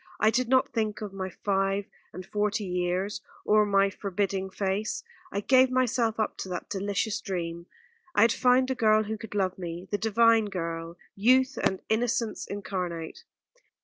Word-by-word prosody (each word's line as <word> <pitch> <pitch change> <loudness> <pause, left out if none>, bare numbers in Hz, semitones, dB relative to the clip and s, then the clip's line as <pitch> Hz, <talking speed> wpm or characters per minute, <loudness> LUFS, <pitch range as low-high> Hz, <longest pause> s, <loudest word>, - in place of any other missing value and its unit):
I 215 +1 +4
did 250 0 0
not 260 0 +3
think 215 -3 -1
of 205 -2 -5
my 190 -1 -4
five 195 +1 0 0.3
and 185 0 -8
forty 210 +2 -1
years 180 +2 -1 0.2
or 210 0 +4
my 195 0 +3
forbidding 195 -1 -2
face. 195 +2 -2 0.3
I 200 - -2
gave 260 +3 +5
myself 240 -3 +1
up 215 - -1
to 190 - -5
that 180 - -5
delicious 200 +1 -1
dream. 170 -5 -4 0.5
I - - +5
had 230 - +5
found 255 +1 +3
the - - +2
girl 215 -3 +3
who 220 +1 -3
could 220 -2 -8
love 190 -2 0
me, 175 +1 -6
the 205 - 0
divine 225 0 +4
girl, 165 -3 -4 0.2
youth 255 +6 +4
and 190 - 0
innocence 230 0 0
incarnate. 180 -5 -5
205 Hz, 165 wpm, -28 LUFS, 190-225 Hz, 0.5 s, gave